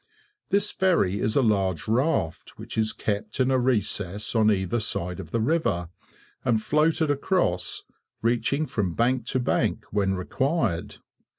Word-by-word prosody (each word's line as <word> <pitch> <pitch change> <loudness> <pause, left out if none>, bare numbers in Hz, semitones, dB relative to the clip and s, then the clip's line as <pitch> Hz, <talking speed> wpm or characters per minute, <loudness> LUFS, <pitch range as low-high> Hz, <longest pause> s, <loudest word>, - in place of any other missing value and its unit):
This 200 +1 +3
ferry 165 - +2
is 110 - 0
a 140 - +4
large 95 -5 +1
raft, 115 - 0
which - - -7
is 110 -1 +1
kept 105 +5 -3
in 130 0 +3
a 130 - +3
recess 105 -5 0
on 110 -2 +4
either 95 +2 +1
side 90 -5 -2
of - - -8
the 115 - -1
river, 110 - 0 0.5
and 115 -3 +2
floated 155 +5 +2
across, 140 - 0 0.4
reaching 120 +6 +1
from 95 - -2
bank 120 0 +1
to 130 - +1
bank 125 - 0
when 100 -2 +1
required. 115 - -1
115 Hz, 150 wpm, -25 LUFS, 100-135 Hz, 0.5 s, a